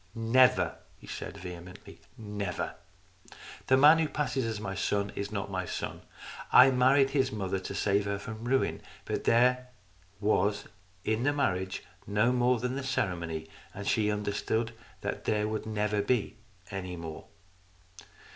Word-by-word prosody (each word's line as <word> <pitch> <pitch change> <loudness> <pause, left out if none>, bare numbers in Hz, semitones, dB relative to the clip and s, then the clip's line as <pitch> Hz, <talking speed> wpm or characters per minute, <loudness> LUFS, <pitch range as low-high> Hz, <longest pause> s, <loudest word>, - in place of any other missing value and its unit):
" 90 - -30
Never," 125 +3 +4 0.2
he - - -15
said - - -6
vehemently, 90 0 -10
" - - -32
never! 105 -4 -4 0.9
The 130 - +5
man 150 +4 +8
who 160 - +2
passes 135 -4 -1
as 110 -2 -3
my 100 -2 -4
son 100 +1 -1
is 100 +1 -4
not 100 -2 -3
my 95 -1 -1
son. - - -4 0.5
I 130 +1 +8
married 135 +2 +4
his 135 -2 +1
mother 95 -3 -2
to 95 - -6
save 100 0 +1
her 100 0 -1
from 110 +3 -7
ruin, 130 +2 +1 0.2
but - - -3
there 125 +2 +4 0.5
was 105 0 +1 0.4
in 110 +1 +1
the 145 +3 +2
marriage 95 -9 -1 0.2
no 105 +4 +3
more 125 0 +3
than 125 +2 -2
the 140 - -3
ceremony, 85 -11 -2 0.3
and 100 +1 -6
she 105 -2 +2
understood 105 +2 -1 0.3
that - - -4
there 105 -1 +1
never 105 -1 -2
would 100 0 -1
be 125 -5 0 0.3
any 95 -2 -4
more." 80 -2 -7
105 Hz, 155 wpm, -30 LUFS, 100-125 Hz, 0.9 s, man